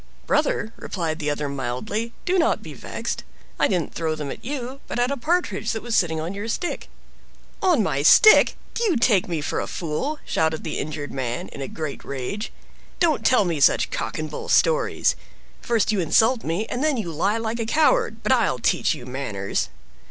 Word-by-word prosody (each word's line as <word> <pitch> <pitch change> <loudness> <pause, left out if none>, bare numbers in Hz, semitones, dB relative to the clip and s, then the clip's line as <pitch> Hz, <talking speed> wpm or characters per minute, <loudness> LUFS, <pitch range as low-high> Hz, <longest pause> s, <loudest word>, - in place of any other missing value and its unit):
"Brother," 220 +2 +1
replied 165 -4 -3
the 150 -2 -1
other 145 0 -1
mildly, 140 - -3
"do 365 +1 +2
not 330 - +2
be - - -8
vexed. - - -5 0.4
I - - +4
didn't 175 -6 -1
throw 160 -1 -1
them 150 -3 -5
at - - -9
you, 265 0 -5
but - - -4
at 245 +2 +1
a - - 0
Partridge 340 +5 0
that 220 - -4
was 235 -1 -1
sitting 160 -3 +2
on 165 +4 -3
your 200 +3 -5
stick." 345 +9 -3 0.7
"On 355 - +3
my 140 -6 0
stick! 430 - +7 0.2
Do 470 - -2
you 360 - +2
take 220 -5 +3
me 165 -4 -2
for 145 - -2
a - - -3
fool?" 175 - -3
shouted 160 0 0
the 160 - -3
injured 145 -1 -4
man, 125 -3 -3
in 140 - -9
a 135 - -3
great 155 -3 -5
rage. 140 - -4 0.5
"Don't 330 -5 +2
tell 250 -6 +4
me 170 -4 -1
such 140 - +4
cock - - -3
and 155 - -3
bull - - -6
stories. - - +3 0.5
First 230 -3 +1
you 210 - 0
insult 225 - +3
me, 170 +7 -1
and 245 +4 -3
then 305 -4 +2
you 200 -7 -3
lie 190 +8 +1
like 225 +1 -3
a 230 - -1
coward; 390 - +2
but - - +1
I'll - - +3
teach - - +1
you 120 - -10
manners!" 115 -7 -3
200 Hz, 200 wpm, -23 LUFS, 155-245 Hz, 0.7 s, stick